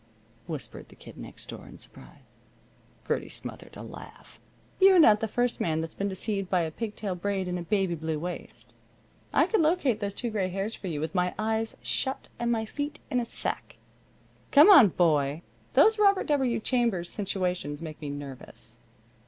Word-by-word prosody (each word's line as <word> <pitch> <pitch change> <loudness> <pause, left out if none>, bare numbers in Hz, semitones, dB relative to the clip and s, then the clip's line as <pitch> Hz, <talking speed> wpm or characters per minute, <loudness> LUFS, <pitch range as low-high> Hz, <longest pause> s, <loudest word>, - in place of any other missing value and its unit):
whispered - - -6
the - - -16
Kid - - -13
Next - - -11
Door, - - -9
in - - -12
surprise. - - -15 0.7
Gertie - - -1
smothered - - -6
a - - -8
laugh. - - -12 0.4
"You're 380 -1 +7
not 220 -11 +7
the 225 - -1
first 245 +2 0
man 160 -2 0
that's 160 0 -4
been 200 0 -2
deceived 195 0 -2
by 180 -2 +2
a 160 -1 -2
pig 215 +4 -5
tail 200 -3 -3
braid 190 +1 -2
and 180 0 -2
a - - -4
baby 190 0 0
blue 160 -1 -3
waist. 175 +3 -7 0.6
I - - +4
could 440 - +2
locate 305 - +2
those 200 -2 -3
two 240 -2 -3
gray 195 -4 -1
hairs 195 +4 -3
for 195 - -8
you 155 -4 -3
with 160 +4 -3
my 180 -1 0
eyes 220 +1 -1
shut 265 0 -2
and 235 0 0
my 220 -1 0
feet 290 +6 -4
in 250 - +2
a 240 - -1
sack. - - -3 0.7
Come 300 +8 +8
on, 290 - +10
boy. 155 -3 +1 0.3
These 440 0 +6
Robert 400 -2 +4
W. 265 -5 +1
Chambers 230 -7 0
situations 180 -7 -2
make 155 -1 -8
me 145 - -4
nervous." 140 -2 -8
200 Hz, 185 wpm, -28 LUFS, 175-240 Hz, 0.7 s, on